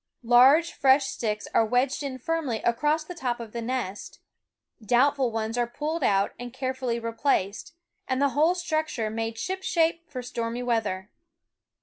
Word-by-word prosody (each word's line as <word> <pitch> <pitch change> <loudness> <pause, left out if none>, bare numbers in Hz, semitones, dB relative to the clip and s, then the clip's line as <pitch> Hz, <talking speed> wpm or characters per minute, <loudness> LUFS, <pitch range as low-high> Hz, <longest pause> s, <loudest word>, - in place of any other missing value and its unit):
Large 260 +8 +6
fresh 270 +1 +4
sticks 215 -5 -3
are - - +5
wedged 250 +5 +1
in 275 -2 -4
firmly 275 -4 -2
across 295 +7 +1
the 360 - -8
top 250 -8 -3
of 230 -2 -8
the 235 - -4
nest; 230 -5 -4 0.6
doubtful 255 +3 +3
ones 225 +1 -2
are 240 - +1
pulled 300 +6 -3
out 200 -3 +2
and 245 0 -6
carefully 255 -2 -2
replaced, 230 - -1 0.3
and 260 -1 0
the 280 0 +3
whole 310 +6 +3
structure 310 -10 -2
made 225 0 -3
shipshape 340 0 -1
for 255 -4 -6
stormy 235 0 -3
weather. 210 -5 -1
250 Hz, 150 wpm, -26 LUFS, 230-295 Hz, 0.6 s, Large